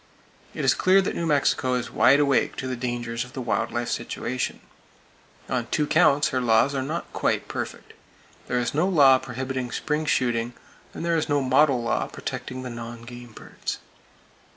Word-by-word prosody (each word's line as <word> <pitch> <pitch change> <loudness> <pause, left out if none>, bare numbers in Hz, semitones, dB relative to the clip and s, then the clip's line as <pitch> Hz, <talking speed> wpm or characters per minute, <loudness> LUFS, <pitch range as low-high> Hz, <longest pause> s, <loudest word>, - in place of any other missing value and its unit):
It - - -2
is - - +5
clear 190 +1 +4
that 190 - 0
New 170 - -2
Mexico 135 -3 +2
is 125 - -3
wide 130 +6 +5
awake 140 -3 +2
to - - -5
the 130 - -2
dangers 120 -1 -3
of 125 - -13
the - - -5
wild 120 -2 -1
life 120 0 -2
situation. 125 +1 -3 0.9
On 120 -2 -2
two 150 - 0
counts, 145 -2 +4
her 130 -1 -1
laws 120 +3 +3
are 135 - -1
not 155 +6 -4
quite - - 0
perfect. - - -6 0.5
There 125 - 0
is 120 -1 -1
no 160 +5 +2
law 140 -8 +6
prohibiting 130 0 -4
spring 150 +4 -2
shooting, 120 -3 0
[Page - - -24 0.3
290] - - -10
and - - -4
there 170 -1 +2
is 155 - -1
no 145 0 +3
"model 135 -1 +3
law" 115 - 0
protecting 130 0 -6
the 125 - -5
non 115 0 -8
game 120 0 -10
birds. - - -6
130 Hz, 190 wpm, -25 LUFS, 120-145 Hz, 0.9 s, law